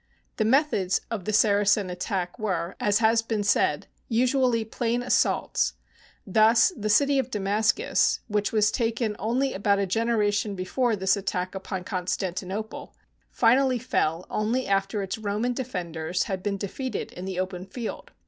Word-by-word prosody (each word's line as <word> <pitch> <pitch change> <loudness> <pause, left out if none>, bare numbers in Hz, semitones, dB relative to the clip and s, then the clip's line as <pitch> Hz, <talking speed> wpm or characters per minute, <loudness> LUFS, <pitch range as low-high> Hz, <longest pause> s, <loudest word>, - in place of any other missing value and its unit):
The 220 - +1
methods 225 -7 +2
of 210 -6 -4
the 215 - -1
Saracen 205 -2 +3
attack 180 +2 -3
were, 185 -5 -2
as 205 0 +2
has 225 +1 +3
been 225 -2 -2
said, 200 - +2 0.2
usually 245 -1 +2
plain 235 +2 -1
assaults. 250 - +1 0.5
Thus 220 - +4
the 215 -2 -3
city 280 +5 +4
of 260 -1 -2
Damascus, 215 - +1
which 210 -2 0
was 215 -1 +3
taken 230 -2 -1
only 255 +5 0
about 200 +1 +1
a 200 - +1
genera 220 +1 +1
tion 205 0 -2
before 225 +6 0
this 190 0 +2
attack 185 -2 -3
upon 190 -1 -5
Constantinople, 190 +2 -4 0.3
finally 255 +2 +3
fell 170 -8 -1
only 230 +5 -1
after 195 +1 0
its 195 +3 -4
Roman 215 +4 -1
defenders 180 -9 -3
had 190 -2 -4
been 200 +1 -2
de 200 - -3
feated 260 +6 -5
in 180 - -7
the 190 -1 -4
open 185 0 -4
field. 230 +3 -6
210 Hz, 155 wpm, -26 LUFS, 190-230 Hz, 0.5 s, Thus